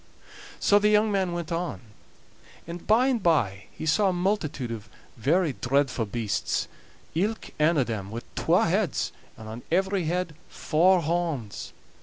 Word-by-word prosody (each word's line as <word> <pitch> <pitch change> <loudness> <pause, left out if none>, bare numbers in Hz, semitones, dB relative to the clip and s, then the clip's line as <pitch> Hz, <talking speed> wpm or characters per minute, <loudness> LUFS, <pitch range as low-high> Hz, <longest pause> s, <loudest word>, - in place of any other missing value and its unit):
So 205 - +5
the 210 +1 +3
young 210 0 +4
man 190 -3 +1
went 170 -1 -4
on, 170 +1 -2 0.9
and 170 +1 -8
by 225 +4 +5
and 255 -4 +1
by 115 - +1
he - - -7
saw 190 +6 +3
a - - 0
multitude 175 - -1
of 105 -3 -7 0.3
very 155 +6 +2
dreadfu' 130 -2 +1
beasts, 115 -4 -1 0.5
ilk 210 +7 -1
ane 155 +2 +4
o' 135 - +4
them 110 -5 -4
wi' 115 +3 -5
twa - - +3
heads, - - 0 0.3
and 110 - -10
on 110 +2 -7
every 190 0 +1
head 175 0 -1 0.2
four 180 +4 +3
horns. 160 -10 -2
165 Hz, 155 wpm, -26 LUFS, 125-190 Hz, 0.9 s, So